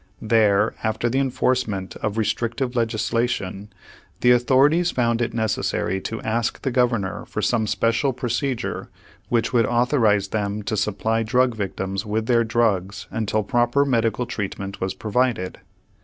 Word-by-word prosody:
There, 110 -2 +3
after 110 +2 0
the 135 - +1
enforcement 125 -7 -1
of 110 0 -3
restrictive 120 +4 -1
legislation, 115 -3 -1 0.5
the 125 - +5
authorities 135 +8 +4
found 115 -4 +1
it 120 - 0
necessary 110 -4 -1
to 115 - -4
ask 115 +1 -1
the 135 - 0
governor 120 -6 0
for - - -4
some 110 -3 +1
special 115 +6 +1
procedure 125 +1 -3 0.4
which 120 +1 +1
would 115 -3 +3
authorize 120 -5 +2
them 105 0 -2
to 110 - -2
supply 105 +2 0
drug 125 +2 +2
victims 95 -2 -3
with 110 +1 -2
their 115 0 +3
drugs 105 -5 0
until 110 -1 -1
proper 120 +5 +2
medical 115 -2 +1
treatment 100 -2 -5
was 95 0 -2
provided. 110 -4 -1
115 Hz, 140 wpm, -23 LUFS, 105-125 Hz, 0.5 s, the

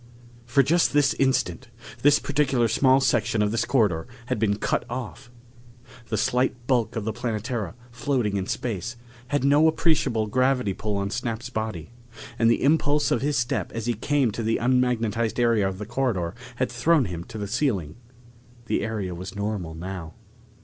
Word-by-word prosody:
For 135 +3 +4
just 165 +4 +2
this 145 -1 +4
instant, 130 -2 0 0.3
this 145 +1 +6
particular 135 -4 +1
small 130 +4 +4
section 115 -4 +2
of 105 - 0
this 115 +1 0
corridor 105 -11 +1 0.2
had 125 -2 -2
been 100 -2 +2
cut - - 0
off. 125 +1 -6 0.8
The - - -1
slight 125 -1 0
bulk 120 -4 +1
of 110 -3 -3
the 110 - -1
Planetara, 115 -2 -3 0.2
floating 120 -3 -1
in 95 -1 -2
space, 120 +1 -3 0.3
had 145 +1 0
no 145 +3 +5
appreciable 155 -9 +2
gravity 125 -1 +1
pull 105 +1 -3
on 100 0 -2
Snap's 120 0 -3
body, 110 -6 -4 0.5
and 115 0 +4
the 115 - +2
impulse 145 0 +2
of 120 - +2
his 145 +1 0
step 120 -1 -1
as 115 -1 -4
he 120 - +1
came 130 +2 +1
to 115 - -4
the 115 0 +1
unmagnetized 115 -2 +1
area 115 -4 +3
of 95 -1 -4
the 105 - -6
corridor 115 -8 -1 0.2
had - - -1
thrown 135 +4 +3
him 85 -3 -5
to 115 - -9
the 105 - -3
ceiling. 100 - -1 0.7
The - - 0
area 105 -4 -3
was 90 +3 -7
normal 100 -6 -3
now. 85 -1 -7
115 Hz, 170 wpm, -25 LUFS, 105-130 Hz, 0.8 s, this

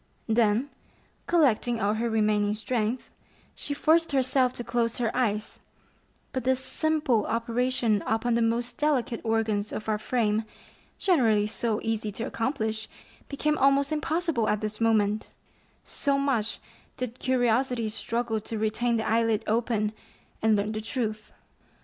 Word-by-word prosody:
Then 225 +3 +2 0.6
collecting 245 -8 +2
all 205 0 +1
her 230 +2 -1
remaining 210 -1 +2
strength, 225 +2 -2 0.4
she 285 - -5
forced 325 +1 +3
herself 260 -1 +3
to 240 - -5
close 235 0 -1
her 235 -3 -1
eyes; 215 -3 -1 0.7
but 260 - -2
this 260 0 +2
simple 295 -6 0
operation 230 -1 +1
upon 225 +2 +1
the 235 - +2
most 235 +1 -1
delicate 260 -6 0
organs 220 -2 0
of 215 - -5
our 215 -1 0
frame, 220 -2 0 0.5
generally 230 - +3
so 220 0 -1
easy 220 -1 -1
to 225 - -4
accomplish, 220 -3 -2 0.4
became 300 +2 0
almost 275 +1 +3
impossible 310 -5 0
at 210 0 0
this 215 +1 -4
moment, 215 -2 +2 0.6
so 280 -2 0
much 260 -6 0 0.4
did 250 0 -5
curiosity 245 -1 +1
struggle 225 +1 -2
to 220 +1 -5
retain 220 +3 0
the 220 - -2
eyelid 225 -1 +2
open 220 -1 0 0.5
and 220 -1 +4
learn 205 +1 0
the 215 0 -3
truth. 215 -2 -3
230 Hz, 135 wpm, -27 LUFS, 215-255 Hz, 0.7 s, and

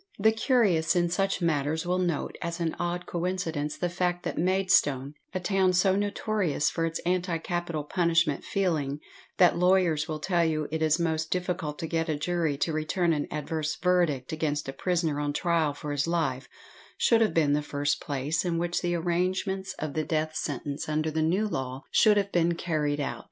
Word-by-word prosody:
The 220 +2 +4
curious 205 - +2
in 175 -1 +2
such 195 0 0
matters 160 0 0
will 180 +1 0
note 175 -4 -1
as 170 0 -3
an 165 -2 -1
odd 175 0 -2
coincidence 170 -4 -2
the 180 - 0
fact 175 0 -1
that - - -3
Maidstone 160 -7 +2 0.2
a 185 - -2
town 190 0 +2
so 185 +1 +3
notorious 205 -6 0
for 165 -1 0
its 165 - -3
anti 180 -1 0
capital 170 -2 -3
punishment 165 -2 +1
feeling, 155 -7 -1 0.4
that 180 -2 +5
lawyers 180 -4 +3
will 155 -2 -3
tell 170 +2 +1
you 155 -2 0
it 160 0 -2
is 155 +1 +3
most 160 -1 0
difficult 180 -4 -2
to 165 - -4
get 165 0 -1
a 155 - +1
jury 160 -2 -1
to 160 +3 -1
return 165 +3 +1
an 145 -2 -2
adverse 155 +1 -2
verdict 175 -8 +1
against 150 -2 -2
a 135 - -4
prisoner 165 -1 0
on 145 0 -1
trial 165 -2 +1
for 145 +1 -6
his 145 +2 0
life 155 -6 -1 0.5
should 230 -1 +4
have 220 - +2
been 150 -3 +3
the 150 - +2
first 145 0 -1
place 145 +3 -1
in 175 -2 -1
which 175 +1 -1
the 175 0 0
arrangements 185 +3 -1
of 155 -2 -4
the 155 - -1
death 155 0 -1
sentence 145 +1 -4
under 155 +1 0
the 160 +1 -1
new 185 +7 +1
law 130 -6 -4
should 210 -2 +5
have 200 0 0
been 170 0 +2
carried 150 -4 -1
out. 145 - -3
165 Hz, 190 wpm, -27 LUFS, 150-180 Hz, 0.5 s, that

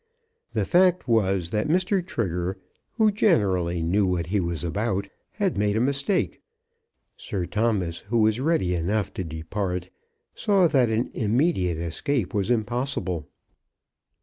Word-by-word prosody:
The - - 0
fact 180 -3 +3
was 95 -7 +1
that 105 +4 0
Mr. 185 +3 +1
Trigger, 95 - -2 0.4
who 220 -2 +3
generally 95 - +2
knew 95 +4 +2
what 90 -2 0
he 100 +4 0
was 85 -2 -1
about, 100 +2 -1 0.3
had 195 - -1
made 105 +1 +1
a - - +2
mistake. 140 - 0 0.7
Sir 95 -4 -4
Thomas, 105 -6 0
who 115 +4 -2
was 110 +1 +3
ready 135 - +1
enough 95 +5 -1
to 95 - -3
depart, 90 +3 -4 0.4
saw 195 -4 +3
that 130 -6 +3
an 110 +2 -1
immediate 110 - +1
escape 90 - -2
was 100 +1 0
impossible. 110 - -1
105 Hz, 135 wpm, -25 LUFS, 90-135 Hz, 0.7 s, fact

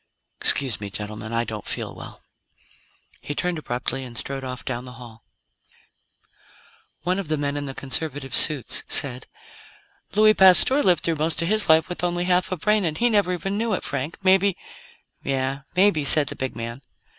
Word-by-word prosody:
Excuse 130 -6 +3
me, 100 - -5
gentlemen; 105 +2 -7
I 115 0 0
don't 110 -3 -7
feel - - -3
well." - - -12 1.0
He 145 - -6
turned 175 0 -2
abruptly 130 -1 -2
and 120 -2 -10
strode 135 -1 -5
off 130 -1 -7
down 125 -1 -4
the 125 - -11
hall. 115 -2 -13 1.8
One 185 +2 0
of 195 - -5
the 155 0 -1
men 145 0 -2
in 145 0 -3
the 135 - -7
conservative 140 -1 -4
suits 145 -5 +3
said: 130 -2 0 0.9
"Louis 215 0 +6
Pasteur 190 +9 +6
lived 180 -7 +2
through 165 -2 0
most 160 +2 -1
of 165 - -2
his 215 -3 +2
life 160 0 +5
with 180 0 -6
only 175 0 -1
half 180 +1 +1
a 185 - -2
brain 210 +4 +1
and 160 -3 -2
he 240 0 +2
never 200 -4 +2
even 195 +3 -3
knew 225 -1 -1
it, - - -3
Frank; 140 +3 -4
maybe 190 0 +3 0.3
" - - -27 0.3
"Yeah. 135 0 -2
Maybe," 185 -5 +3
said 145 0 +5
the - - -4
big 130 -1 -5
man. 115 +2 -6
150 Hz, 185 wpm, -23 LUFS, 130-185 Hz, 1.8 s, Louis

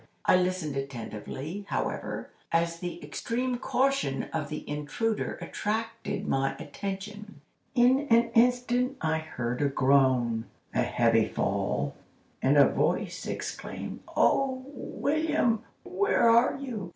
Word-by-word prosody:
I - - +6
listened 180 -5 0
attentively, 135 - -5
however, - - -3 0.2
as 170 0 +1
the 175 0 -5
extreme 245 +11 -2
caution 265 - +1
of 155 -3 -2
the 150 - -6
intruder 150 +10 -2
attracted 220 -1 -3
my 135 0 +1
attention. 200 +2 -6 0.3
In 260 +4 +4
an 235 0 +4
instant 245 +2 +3
I 160 0 +1
heard 125 -6 -3
a 145 - +3
groan, 130 -4 +3 0.3
a - - +2
heavy 115 -2 +3
fall, - - -1 0.5
and 140 +3 +4
a 140 - +8
voice - - -1
exclaim: - - -5 0.2
'Oh, 260 -1 +3
William, 290 -5 0 0.2
where 370 - +2
are 235 +3 +5
you? 235 -10 -5
195 Hz, 115 wpm, -28 LUFS, -, 0.5 s, a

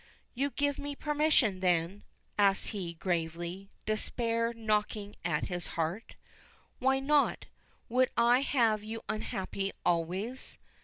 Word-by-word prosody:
"You 275 +3 0
give 285 +2 0
me 285 0 -4
permission, 295 -10 +2
then?" 180 +2 +1 0.3
asks 200 -1 +3
he, 180 -6 -4
gravely, 175 +2 -2 0.2
despair 230 +1 0
knocking 210 -2 -1
at 160 -3 0
his 175 -2 -4
heart. 170 +7 -2 0.6
"Why 265 +1 +3
not 290 +1 +2 0.4
would 255 +2 +3
I 240 +2 +6
have 230 -6 +2
you 225 +1 -6
unhappy 195 -2 -3
always?" 180 +9 -1
215 Hz, 115 wpm, -31 LUFS, 185-250 Hz, 0.6 s, I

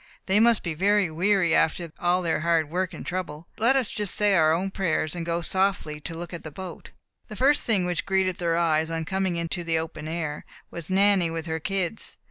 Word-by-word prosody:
"They 190 +2 +3
must 230 0 +4
be 170 - -2
very 195 +1 +2
weary 180 0 +2
after 165 +1 +1
all 180 0 +2
their 165 -2 0
hard 160 -2 +1
work 185 0 -1
and - - -9
trouble. 170 -4 -4
Let 235 +5 +4
us 260 -4 +2
just 205 -2 -3
say 205 -1 +3
our 160 -4 +4
own 185 +4 0
prayers, 170 -5 -1
and 170 - -3
go 170 0 -1
out 170 - -2
softly 185 -5 0
to 165 +2 -6
look 175 +1 -7
at 170 - -7
the 155 - -6
boat." 180 +2 -9 0.4
The 215 - -8
first 275 +6 +3
thing 200 -6 +2
which 180 +1 -2
greeted 190 -2 +1
their 170 -1 +1
eyes, 160 -2 +2
on 165 -1 -3
coming 180 -2 -1
to 175 +1 -3
the 165 -1 0
open 160 -1 -5
air, 155 -2 -3 0.3
was 170 -1 -5
Nanny 190 -2 +4
with 165 0 -4
her 160 -1 -2
kids. 195 +3 -2
175 Hz, 225 wpm, -25 LUFS, 165-195 Hz, 0.4 s, must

